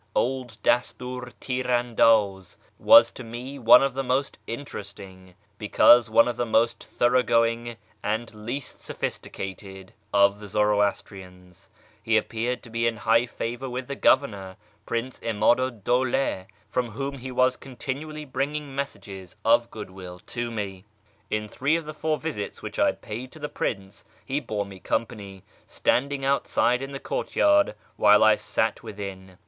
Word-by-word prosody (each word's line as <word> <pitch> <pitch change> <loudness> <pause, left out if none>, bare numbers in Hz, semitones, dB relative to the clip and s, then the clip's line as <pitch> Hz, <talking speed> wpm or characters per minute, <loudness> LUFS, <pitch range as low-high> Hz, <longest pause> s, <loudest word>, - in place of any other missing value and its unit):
Old 125 -3 -1
Dastiir 125 0 -1
Tir 130 -1 -3
andaz 115 -6 +2 0.2
was - - +8
to - - -9
me 125 +4 -7
one 120 +2 +7
of 135 -2 0
the 135 +1 -2
most 135 +2 -1
interest 115 -4 -7
ing, 95 -2 -13 0.2
because 120 +2 +5
one 115 +2 +5
of 120 -1 -3
the 120 - 0
most 115 +1 +1
thoroughgoing 120 -1 +1 0.2
and 110 +2 -2
least 120 +6 -6
sophisticated, 95 0 -6 0.2
of 100 0 +4
the 105 - -9
Zoroastrians. 95 -3 -2 0.3
He 115 +1 +2
appeared 115 +3 -2
to 120 - -13
be 115 0 0
in 115 -1 -1
higli 115 +3 +2
favour 120 +4 -4
with 125 +1 -4
the 140 - -4
governor, 100 -11 +1 0.3
Prince 120 +2 -3
'Imadu 115 +4 +2
'd 115 -6 -16
Dawla, 125 -5 0 0.2
from 125 +2 -1
whom 135 +5 -5
he 130 +1 -7
was 130 0 +3
continually 145 +4 -6
bringing 145 +1 -3
messages 100 -9 -6
of - - +4
goodwill 95 -1 -9
to 120 -1 -4
me. 100 -4 -5 0.5
In 105 0 -2
three 140 +8 0
of 165 -1 -2
the 155 - -6
four 155 0 -1
visits 150 -12 -5
which - - -6
I - - +4
paid 120 +4 -8
to - - -12
the 150 0 -4
Prince, 95 -1 -4 0.2
he 140 +2 -1
bore 110 -7 -3
me 100 -1 -11
company, 100 -2 -4 0.2
standing 135 +1 0
outside 130 -2 +1
in 135 +1 -6
the 135 - -6
courtyard 300 - +2 0.2
while 105 0 +6
I 110 0 +7
sat 110 -1 -1
within. 95 -4 -8
115 Hz, 155 wpm, -25 LUFS, 105-130 Hz, 0.5 s, was